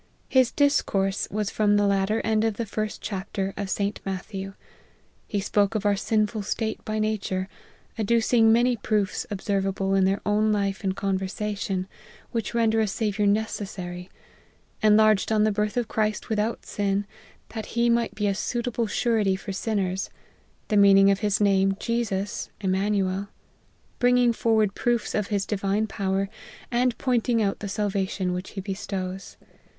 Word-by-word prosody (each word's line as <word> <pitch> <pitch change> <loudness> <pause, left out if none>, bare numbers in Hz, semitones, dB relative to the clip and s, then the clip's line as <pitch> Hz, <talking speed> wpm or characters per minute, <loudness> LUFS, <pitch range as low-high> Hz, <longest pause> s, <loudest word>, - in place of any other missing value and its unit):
His 260 -3 +4
discourse 205 -9 +1
was 210 -1 -2
from 205 -1 +3
the 205 - +3
latter 200 +2 +1
end 220 -1 +1
of 225 -2 0
the 235 - -3
first 215 +1 -4
chapter 195 -1 -3
of 200 -1 -4
St. 200 +1 -1
Matthew. 195 0 -5 0.7
He 205 - -1
spoke 205 +1 +1
of 210 -1 -1
our 205 -1 +4
sinful 215 +1 0
state 220 +2 -3
by 215 0 -3
nature, 205 -3 -1 0.5
adducing 225 +1 +4
many 240 +2 +4
proofs 210 -3 -1
observable 195 -1 -1
in 195 -1 +4
their 195 +1 +1
own 215 +1 +2
life 200 -1 -1
and 190 -1 0
conversation, 195 0 -2 0.4
which 230 0 -3
render 225 -1 +3
a 220 - +2
Saviour 210 0 0
necessary; 190 -4 -2 0.7
enlarged 215 -1 +4
on 215 -1 +3
the 215 - +3
birth 210 +3 -1
of 240 -2 0
Christ 215 -2 -1
without 220 +1 -1
sin, 200 0 -1 0.4
that 220 -2 -6
he 235 0 +4
might 235 -2 +1
be 210 -1 -1
a 200 - +2
suitable 235 +2 -2
surety 210 -3 +1
for 195 +1 -6
sinners; 195 -2 -1 0.6
the 210 - +2
meaning 200 0 +7
of 195 - +1
his 210 -1 +1
name 195 -1 +3
Jesus, 220 -4 -2
Immanuel; 195 0 0 0.7
bringing 245 -1 +4
forward 220 -3 +2
proofs 240 0 0
of 210 -2 0
his 200 -2 -1
divine 200 +1 0
power, 195 -2 -1 0.4
and 245 -1 +1
pointing 245 -2 +1
out 200 -2 0
the 205 - -5
salvation 195 -2 -1
which 180 +1 -4
he 195 - -4
bestows. 190 -1 -5
205 Hz, 155 wpm, -25 LUFS, 195-220 Hz, 0.7 s, meaning